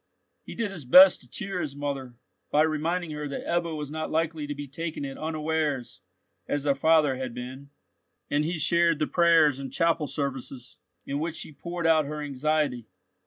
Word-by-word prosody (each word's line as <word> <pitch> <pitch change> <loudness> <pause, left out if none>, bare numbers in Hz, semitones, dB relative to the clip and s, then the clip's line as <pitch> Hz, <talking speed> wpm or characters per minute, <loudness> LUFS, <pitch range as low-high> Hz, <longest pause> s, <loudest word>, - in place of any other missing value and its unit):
He - - -10
did 225 -3 -2
his 175 -6 -7
best 185 +8 +8
to 125 - -18
cheer 195 - -4
his 145 -4 -4
mother, 140 -4 -4 0.3
by 150 +1 +4
reminding 160 +2 -1
her 150 -1 -4
that 140 - -5
Ebbo 170 -2 -1
was 150 -1 -5
not 155 0 -3
likely 160 -1 -1
to 145 - -4
be 145 0 -7
taken 155 +1 -5
at 135 -1 -6
unawares 155 -4 -2 0.5
as 145 -1 -1
their 145 -1 +3
father 150 -1 +3
had 130 -2 -5
been; 130 +3 -8 0.6
and 145 +1 +1
he 165 +2 -2
shared 170 +1 +3
the 155 - 0
prayers 165 -5 +4
and 135 -1 -6
chapel 165 -2 +1
services, 135 -3 -5 0.3
in 140 +1 -3
which 165 +1 -3
she - - -5
poured 170 +4 -5
out 160 -2 +4
her 150 +1 -5
anxiety. 145 -4 -1
150 Hz, 185 wpm, -27 LUFS, 140-165 Hz, 0.6 s, best